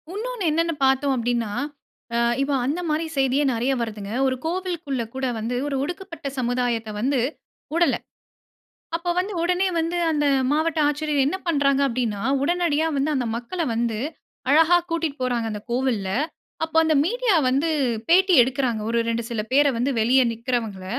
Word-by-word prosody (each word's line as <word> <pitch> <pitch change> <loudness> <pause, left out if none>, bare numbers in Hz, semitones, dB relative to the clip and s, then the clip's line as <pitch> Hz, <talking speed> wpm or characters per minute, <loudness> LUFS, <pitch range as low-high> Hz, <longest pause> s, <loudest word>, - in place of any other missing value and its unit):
உன்னோன்னு 445 -2 -3
என்னன்னு 330 +2 +1
பார்த்தோம் 270 +1 +2
அப்டின்னா, 235 -3 -1 0.6
அ - - +2 0.2
இப்போ 280 +1 0
அந்த 295 +7 -1
மாரி 310 +2 0
செய்தியே 270 +1 +2
நெறைய 245 +4 0
வருதுங்க. 210 -3 -5 0.2
ஒரு 260 - 0
கோவிலுக்குள்ள 335 -7 -2
கூட 265 0 -2
வந்து 230 +3 -2
ஒரு 285 - -2
ஒடுக்கப்பட்ட 335 -1 -6
சமுதாயத்த 245 -2 -1
வந்து 265 +4 +1 0.5
வுடல. 340 +1 +3 1.0
அப்ப 340 +1 -5
வந்து 390 +3 -2
உடனே 360 +2 +2
வந்து 330 +2 -1
அந்த 295 -1 +1 0.3
மாவட்ட 315 +1 +1
ஆட்சியர் 300 +1 -1
என்ன 305 +7 0
பண்றாங்க 280 -4 +2
அப்படின்னா, 230 -5 -2 0.2
உடனடியா 325 -1 +1
வந்து 280 +3 +1
அந்த 255 -2 0
மக்களை 320 +9 -3
வந்து 230 -1 0 0.5
அழகா 325 +4 +6
கூட்டிட்டு 325 -3 -1
போறாங்க 240 -2 0
அந்த 210 -1 -5
கோவில்ல. 240 -6 0 0.5
அப்போ, 320 0 -1
அந்த 315 -1 +3
மீடியா 475 +1 +1
வந்து 280 +6 +1 0.4
பேட்டி 370 +2 +5
எடுக்கிறாங்க, 250 -3 -1
ஒரு 235 0 +1
2 230 0 -1
சில 230 -3 -2
பேரை 285 +2 +5
வந்து, 250 +4 +1
வெளிய 250 +4 +4
நிக்கிறவங்கள. 230 -5 -3
275 Hz, 150 wpm, -23 LUFS, 240-330 Hz, 1.0 s, அழகா